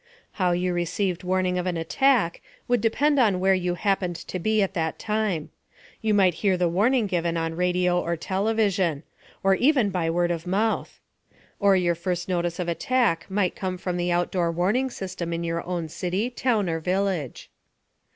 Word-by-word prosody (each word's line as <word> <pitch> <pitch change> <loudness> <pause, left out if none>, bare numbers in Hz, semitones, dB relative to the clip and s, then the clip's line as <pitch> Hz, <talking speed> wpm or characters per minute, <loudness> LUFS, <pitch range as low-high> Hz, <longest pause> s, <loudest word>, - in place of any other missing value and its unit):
How 180 -1 +3
you 180 +1 0
received 180 +1 -1
warning 185 0 0
of 180 - -2
an 175 -2 -1
attack 210 +2 +2 0.3
would 245 0 +2
depend 285 +6 +2
on 205 -7 +3
where 190 +1 +3
you 180 -1 0
happened 190 -2 0
to 185 - -6
be 215 +3 +2
at 195 - -2
that 160 -3 -2
time. 210 -7 -2 0.5
You 215 -1 +1
might 190 -3 +4
hear 195 -3 +2
the 180 -1 +2
warning 220 +8 +2
given 170 -3 -1
on 165 0 -2
radio 180 +1 +1
or 170 0 -2
television, 195 -4 0 0.4
or 195 0 +4
even 250 -1 +3
by 175 -3 -1
word 175 +1 +1
of 170 0 -4
mouth. 215 +4 -1 0.6
Or 200 -2 +4
your 175 -2 +2
first 175 +1 -3
notice 175 -2 -1
of 180 - -3
attack 175 -1 +1
might 190 -2 0
come 185 -1 -3
from 180 0 -3
the 175 0 0
outdoor 175 0 0
warning 200 +10 +1
system 185 -6 -5
in 170 0 -2
your 170 0 -2
own 175 -3 -2
city, 185 +9 -2
town 235 -6 0
or 165 -1 -1
village. 180 -5 -2
180 Hz, 180 wpm, -25 LUFS, 175-205 Hz, 0.6 s, might